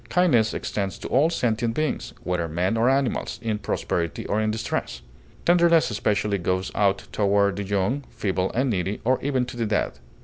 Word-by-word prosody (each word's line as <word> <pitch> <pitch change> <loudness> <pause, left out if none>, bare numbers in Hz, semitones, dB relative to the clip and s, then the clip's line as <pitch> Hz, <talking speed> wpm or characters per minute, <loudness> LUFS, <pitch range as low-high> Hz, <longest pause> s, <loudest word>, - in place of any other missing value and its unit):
Kindness 135 -12 +3
extends 100 -2 -3
to - - -7
all 145 +5 +4
sentient 115 -6 0
beings, 155 -2 -2
whether 90 -2 -1
men 90 +7 0
or 115 +3 +3
animals, 135 -2 0
in 110 -2 -1
prosperity 85 -4 -2
or 105 - 0
in 110 - +1
distress. 110 - -3 0.4
Tenderness 170 -5 +4
especially 105 -1 0
goes 95 +2 -1
out 100 -1 +1
toward 100 -1 +2
the 100 - -2
young, 100 +8 -1
feeble, 95 -2 -1
and 130 +3 +1
needy, 95 0 -1
or 130 +2 +2
even 130 -3 0
to 120 - -8
the 115 -2 -1
dead. 105 - -1
110 Hz, 175 wpm, -24 LUFS, 95-130 Hz, 0.4 s, all